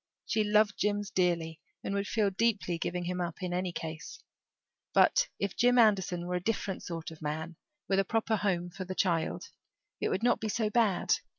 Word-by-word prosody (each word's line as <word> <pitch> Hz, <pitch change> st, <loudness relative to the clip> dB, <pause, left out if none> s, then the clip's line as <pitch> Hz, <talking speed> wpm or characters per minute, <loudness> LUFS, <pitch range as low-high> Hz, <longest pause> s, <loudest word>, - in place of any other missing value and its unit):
She 215 Hz, -, +1 dB
loved 210 Hz, -1 st, +3 dB
Jims 205 Hz, 0 st, 0 dB
dearly 170 Hz, -3 st, 0 dB, 0.2 s
and 195 Hz, -, -2 dB
would 200 Hz, 0 st, -1 dB
feel 210 Hz, -3 st, +1 dB
deeply 195 Hz, -4 st, 0 dB
giving 175 Hz, +1 st, -2 dB
him 180 Hz, +1 st, -2 dB
up 175 Hz, +1 st, -4 dB
in 180 Hz, -1 st, -2 dB
any 180 Hz, 0 st, -1 dB
case; 165 Hz, -, -7 dB, 0.7 s
but -, -, +5 dB
if 200 Hz, -2 st, -2 dB
Jim 245 Hz, +1 st, +4 dB
Anderson 190 Hz, -6 st, +3 dB
were 180 Hz, -, -3 dB
a 180 Hz, -, +1 dB
different 200 Hz, -3 st, -2 dB
sort 165 Hz, -2 st, -6 dB
of 160 Hz, -, -11 dB
a -, -, -9 dB
man, 160 Hz, +3 st, -3 dB, 0.3 s
with 195 Hz, 0 st, +2 dB
a -, -, +4 dB
proper 225 Hz, +2 st, 0 dB
home 175 Hz, -4 st, -1 dB
for 190 Hz, +2 st, -6 dB
the 185 Hz, +1 st, -6 dB
child, 170 Hz, -4 st, 0 dB, 0.5 s
it -, -, 0 dB
would 190 Hz, +4 st, -1 dB
not 240 Hz, 0 st, +3 dB
be 220 Hz, -, -3 dB
so 220 Hz, 0 st, 0 dB
bad. 215 Hz, -6 st, +2 dB
190 Hz, 200 wpm, -30 LUFS, 175-210 Hz, 0.7 s, but